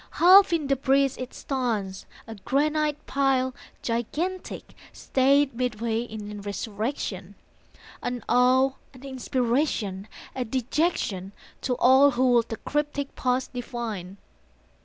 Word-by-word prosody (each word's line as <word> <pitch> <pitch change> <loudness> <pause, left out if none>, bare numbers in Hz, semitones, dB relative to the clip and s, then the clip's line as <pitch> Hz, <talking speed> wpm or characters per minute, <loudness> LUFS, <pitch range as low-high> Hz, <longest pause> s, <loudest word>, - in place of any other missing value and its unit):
Half 380 +3 +8
in 330 -3 +1
debris 275 0 +2
it 255 0 -5
stands, 220 -8 -3 0.2
a 225 - -8
granite 300 +7 0
pile 265 -2 +1 0.3
Gigantic, 310 +11 -3 0.2
stayed 275 +1 +2
midway 230 -2 -1
in 210 -3 -7
resurrection, 205 -1 -4 0.7
An 245 -3 -4
awe, 255 +2 +4 0.2
an 255 - -14
inspiration, 245 -6 -1 0.3
a 255 - -2
dejection 245 - -1 0.3
To 250 - -1
all 265 +3 +6
who 255 -1 +2
would 235 -1 +3
the 225 - -4
cryptic 295 -1 -3
past 255 0 -1
divine. 230 -7 -5
255 Hz, 110 wpm, -26 LUFS, 225-275 Hz, 0.7 s, Half